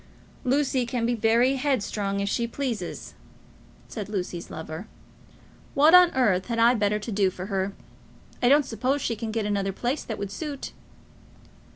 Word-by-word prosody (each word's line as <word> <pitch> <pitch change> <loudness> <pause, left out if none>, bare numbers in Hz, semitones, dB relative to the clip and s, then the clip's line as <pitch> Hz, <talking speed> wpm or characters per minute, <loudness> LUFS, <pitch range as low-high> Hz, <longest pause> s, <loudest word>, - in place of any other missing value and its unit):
"Lucy 265 -1 +1
can 240 -1 -2
be 240 - +1
very 235 +4 +3
headstrong 210 -7 -1
if 200 - -1
she 235 +3 0
pleases," 235 -7 -4 0.7
said 210 -3 -6
Lucy's 180 -4 -4
lover. 160 +5 -7 0.9
"What 300 +4 +6
on 360 -1 +9
earth 210 -8 +2
had 235 -1 -2
I 230 +2 +5
better 210 -2 +1
do 205 -2 0
for 185 0 -7
her? 195 0 -2 0.7
I 245 - +4
don't 290 +1 +5
suppose 260 +5 -1
she 230 - -1
can 220 +1 -5
get 220 -1 -2
another 200 -1 0
place 245 +9 -2
that 220 - -5
would 200 -1 -5
suit." 295 -4 -5
225 Hz, 160 wpm, -26 LUFS, 200-255 Hz, 0.9 s, on